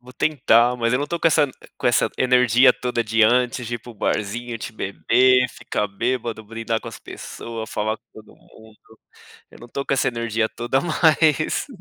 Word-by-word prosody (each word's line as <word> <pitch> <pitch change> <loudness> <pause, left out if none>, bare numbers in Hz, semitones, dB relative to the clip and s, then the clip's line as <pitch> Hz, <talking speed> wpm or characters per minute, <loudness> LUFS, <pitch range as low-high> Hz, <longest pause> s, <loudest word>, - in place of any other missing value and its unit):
Vou 125 +1 -15
tentar, 125 -5 +3
mas 115 -1 0
eu 125 - +2
não 145 - -2
tô 170 +3 -3
com - - +1
essa 150 -2 +3 0.3
com - - -2
essa 120 - +2
energia 125 0 +5
toda 125 -1 -2
de 115 0 +1
antes 125 +2 +2
de 120 - -3
ir - - -13
para 120 - -13
o 115 - -13
barzinho, 115 +3 -3
de - - -6
beber, 125 +5 +2
ficar 105 - -3
bêbado, 115 +1 -3
brindar 115 +1 -3
com - - -8
as - - -9
pessoas, 115 -1 -8
falar 110 +1 -2
com - - -43
todo 110 -1 -15
mundo, 110 0 -20 0.5
eu - - -15
não 120 - -12
tô 140 +3 -5
com - - 0
essa 135 - +1
energia 115 -2 -1
toda 120 +3 -1
mais. 160 - +2
120 Hz, 200 wpm, -22 LUFS, 110-125 Hz, 0.5 s, energia